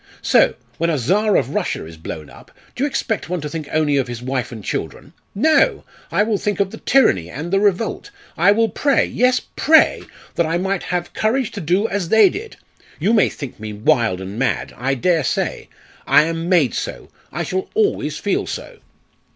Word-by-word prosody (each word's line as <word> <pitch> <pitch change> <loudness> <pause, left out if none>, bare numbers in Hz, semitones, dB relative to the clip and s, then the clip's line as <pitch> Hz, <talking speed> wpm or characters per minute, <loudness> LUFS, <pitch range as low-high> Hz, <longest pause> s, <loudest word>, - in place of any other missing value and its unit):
So, - - +4 0.2
when 170 +1 +1
a 160 - +1
Czar 200 - +2
of 135 0 -1
Russia 195 - -2
is 80 0 -11
blown 80 -1 -7
up, 60 - -16 0.3
do 255 - -2
you - - +3
expect 225 - -2
one 180 0 -1
to 150 - -4
think 150 0 -6
only 150 -2 +2
of 135 -2 0
his 120 -1 -6
wife 130 0 -3
and 110 -4 -8
children? 130 - -5 0.2
No! 310 +10 +3 0.3
I - - +3
will 215 -2 0
think 205 -3 -2
of 195 -1 +1
the - - -9
tyranny 95 - +3
and 160 - -6
the 195 - +4
revolt; 205 - 0 0.3
I 180 +5 +4
will 225 +2 +3
pray, 280 +6 +2
yes, 250 +1 +2 0.2
pray 320 +2 +4 0.3
that 170 - +1
I 165 +2 0
might 190 +1 -1
have 175 -1 -2
courage 235 +3 0
to 205 - -6
do 180 +7 +1
as 195 -5 -3
they 220 -3 +6
did! 440 +3 -8 0.4
You 220 - +2
may 215 - +4
think 140 -6 -8
me 110 0 -6
wild 110 -3 +1
and 95 +4 -6
mad. 135 - -1
I 135 +3 -1
dare 165 +4 +1
say. - - -2 0.4
I 150 - +6
am 165 +1 -3
made 165 - +3
so. - - -5 0.2
I - - -3
shall 185 0 -3
always 430 -1 0
feel - - -1
so!" - - -7
175 Hz, 200 wpm, -20 LUFS, 135-210 Hz, 0.4 s, they